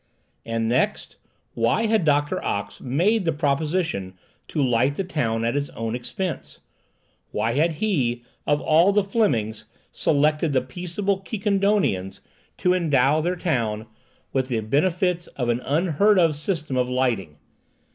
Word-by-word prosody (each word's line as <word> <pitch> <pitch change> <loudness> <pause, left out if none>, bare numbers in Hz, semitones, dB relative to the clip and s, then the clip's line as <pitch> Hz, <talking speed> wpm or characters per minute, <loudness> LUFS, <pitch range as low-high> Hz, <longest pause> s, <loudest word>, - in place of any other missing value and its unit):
And 115 0 -1
next, 120 +3 0 0.4
why 115 - +1
had 220 -5 +2
Doctor 145 -1 +1
Ox 100 0 -3
made 180 - +1
the 165 - +1
proposition 145 - -1 0.3
to - - -4
light 130 +1 +2
the 195 - -1
town 115 -11 -1
at 115 - +1
his 145 0 -1
own 115 0 -4
expense? 145 +7 -5 0.7
Why 115 - -1
had 160 +7 +2
he, 140 - 0 0.2
of 145 0 +3
all 165 +5 +4
the 205 0 +3
Flemings, 115 - 0 0.3
selected 150 +1 +1
the 130 - +3
peaceable 180 +8 -2
Quiquendonians, 195 - 0 0.4
to 180 - +2
endow 150 -4 +3
their 175 +3 0
town 115 - -1 0.5
with 130 -1 0
the 120 -4 -1
benefits 175 - 0
of 125 -3 -1
an 120 0 +1
unheard 170 +9 +2
of 165 -4 +4
system 155 -3 -2
of 125 0 +1
lighting? 115 -12 -1
145 Hz, 140 wpm, -23 LUFS, 120-180 Hz, 0.7 s, all